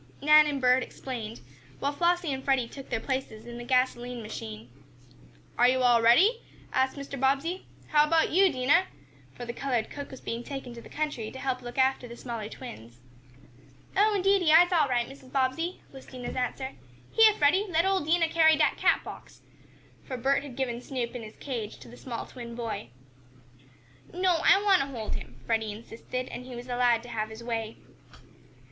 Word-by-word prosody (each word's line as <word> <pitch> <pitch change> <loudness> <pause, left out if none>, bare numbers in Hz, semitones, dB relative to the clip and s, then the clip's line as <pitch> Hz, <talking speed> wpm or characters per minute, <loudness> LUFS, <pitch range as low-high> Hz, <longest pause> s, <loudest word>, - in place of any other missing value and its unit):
Nan 300 +1 +7
and 285 -2 -1
Bert 255 0 +4
explained, 235 -4 -6 0.4
while 280 - -1
Flossie 345 -1 +1
and 265 0 -5
Freddie 265 -4 +1
took 270 +2 -11
their 225 - -1
places 260 -4 -4
in 240 0 -8
the - - -6
gasoline 245 -1 0
machine. 110 - -7 0.9
"Are 245 - +7
you 255 0 +2
all 240 -2 +5
ready?" 370 - +5 0.3
asked 260 +2 +1
Mr. 280 -1 -6
Bobbsey. 280 +8 0 0.2
"How 300 0 +4
about 325 +1 +2
you, 375 +2 +5
Dinah?" 290 +8 +3 0.5
for 245 - -7
the 235 - -5
colored 245 -4 -2
cook 285 -1 -7
was 265 - -10
being 230 +1 -5
taken 270 -3 -7
to 235 - -10
the - - -14
country 295 -8 -3
to 265 - -10
help 260 -1 -2
look 240 0 -9
after 260 -1 +2
the 235 0 -10
smaller 230 -4 -5
twins. 120 - -10 1.0
"Oh, 420 +2 +4
indeedy 390 -4 +3
I'se 350 +3 +7
all 310 -4 +4
right, 240 -2 0
Mrs. 265 -1 -14
Bobbsey," 275 +7 -1
was 265 -1 -12
Dinah's 250 -2 -7
answer. 260 +1 -2 0.4
"Heah, 440 -2 +6
Freddie, 345 +9 +3
let 335 0 +2
ole 385 0 +2
Dinah 330 +2 +2
carry 320 -1 +5
dat - - +2
cat - - +2
box," - - -11 0.7
for 255 - -4
Bert 270 +3 +2
had 275 -3 -9
given 245 -2 -2
Snoop 250 -2 -4
in 245 - -5
his 215 -1 -10
cage 235 -7 -5
to - - -14
the 240 - -12
small 245 -2 -6
twin 235 -2 -9
boy. 230 - -5 1.2
"No, 360 -1 +2
I 395 - +6
want 390 -3 +5
to 275 - -2
hold 235 -6 -5
him," 125 0 -7
Freddie 220 - 0
insisted, 230 +4 -6
and 250 - -7
he 255 - -8
was 240 +1 -9
allowed 245 -1 +2
to 245 - -11
have 215 -2 -3
his 220 +1 -10
way. 225 -2 -3
260 Hz, 190 wpm, -28 LUFS, 235-300 Hz, 1.2 s, Nan